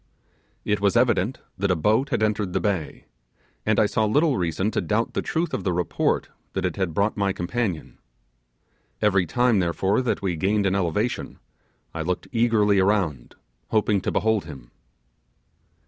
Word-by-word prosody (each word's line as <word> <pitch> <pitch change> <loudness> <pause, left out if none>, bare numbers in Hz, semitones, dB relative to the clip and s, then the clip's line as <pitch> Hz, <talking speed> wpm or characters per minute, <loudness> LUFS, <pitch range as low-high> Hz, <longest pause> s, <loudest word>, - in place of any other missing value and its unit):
It 105 -1 0
was 100 +3 +3
evident 120 -1 +2 0.2
that 100 0 +1
a 90 - +3
boat 110 - +1
had 120 -5 0
entered 105 -3 0
the - - +1
bay, 95 -8 -2 0.6
and 110 -1 +3
I - - +5
saw 110 +1 0
little 145 +7 +2
reason 90 +3 -1
to - - 0
doubt 110 +2 -1
the - - -1
truth 170 +2 -2
of 95 - -2
the 90 - 0
report 90 -1 0 0.2
that 95 -1 -1
it 90 - -1
had 95 -5 -2
brought 100 +2 +1
my 100 -1 +1
companion. 95 -1 -3 1.0
Every 100 -4 +2
time 120 +1 +2
therefore 95 +5 +1
that 125 -5 -2
we 90 -3 0
gained 100 +5 +1
an 95 - +2
elevation, 100 +5 -1 0.6
I 80 - -4
looked 90 +2 -2
eagerly 110 -4 +3
around, 95 - 0 0.3
hoping 105 -2 +1
to - - -2
behold 110 -4 +1
him. 65 -6 -11
100 Hz, 165 wpm, -24 LUFS, 90-110 Hz, 1.0 s, I